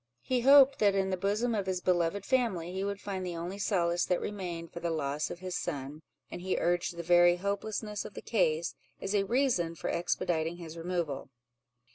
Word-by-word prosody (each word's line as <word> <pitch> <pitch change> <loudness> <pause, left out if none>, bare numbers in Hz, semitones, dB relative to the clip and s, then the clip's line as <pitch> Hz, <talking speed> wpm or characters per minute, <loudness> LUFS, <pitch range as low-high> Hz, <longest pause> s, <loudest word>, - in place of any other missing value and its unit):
He 255 -1 +1
hoped, 275 +1 +7
that 205 -2 +4
in 190 -1 +1
the - - +1
bosom 210 +6 0
of 200 -3 -1
his 185 -1 0
beloved 180 +2 +1
family, 205 -10 0
he 190 +1 -2
would 200 0 -3
find 195 -2 -4
the 180 -2 -4
only 175 +4 -5
solace 175 -4 +1
that 180 - +1
remained 175 -5 -5
for - - -5
the 170 - -2
loss 150 -2 -1
of 175 - -8
his 185 -1 -4
son; 145 -3 -4 0.3
and - - -6
he 185 +1 -1
urged 175 0 0
the 170 - -4
very 175 +1 +6
hopelessness 205 +2 -3
of - - -10
the - - -6
case, 170 -7 +1 0.3
as 195 - -3
a 200 -1 +2
reason 230 -10 +1
for - - -3
expediting 170 -1 -1
his 165 -2 -8
removal. 165 -6 -3
180 Hz, 200 wpm, -30 LUFS, 170-200 Hz, 0.3 s, hoped